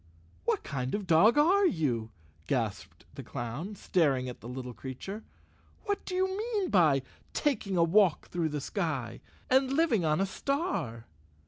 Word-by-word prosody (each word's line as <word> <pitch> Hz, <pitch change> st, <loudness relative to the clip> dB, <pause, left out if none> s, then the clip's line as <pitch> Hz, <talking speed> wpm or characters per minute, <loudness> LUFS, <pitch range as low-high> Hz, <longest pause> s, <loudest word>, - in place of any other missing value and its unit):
"What -, -, +1 dB
kind 130 Hz, 0 st, -3 dB
of 210 Hz, -, -2 dB
a -, -, -9 dB
dog 185 Hz, -, +5 dB
are 370 Hz, +6 st, +5 dB
you?" 125 Hz, -, -1 dB, 0.4 s
gasped 115 Hz, -7 st, -3 dB
the -, -, -7 dB
clown, 140 Hz, -, -5 dB
staring 140 Hz, -10 st, +1 dB
at 125 Hz, -, -7 dB
the 115 Hz, -, -8 dB
little 125 Hz, -1 st, -6 dB
creature. 130 Hz, -, -7 dB, 0.3 s
" -, -, -32 dB
What 405 Hz, -1 st, -1 dB
do 365 Hz, -, -4 dB
you 375 Hz, +1 st, +2 dB
mean 420 Hz, -3 st, -1 dB
by 155 Hz, -9 st, +4 dB, 0.3 s
taking 210 Hz, -10 st, 0 dB
a 170 Hz, -, +5 dB
walk 180 Hz, 0 st, +3 dB
through 170 Hz, -2 st, -1 dB
the 150 Hz, -1 st, -3 dB
sky, 150 Hz, -, -3 dB, 0.3 s
and 265 Hz, +1 st, +3 dB
living 275 Hz, -, +2 dB
on 155 Hz, 0 st, +2 dB
a 195 Hz, -, +2 dB
star?" 235 Hz, -, -2 dB
170 Hz, 165 wpm, -30 LUFS, -, 0.4 s, dog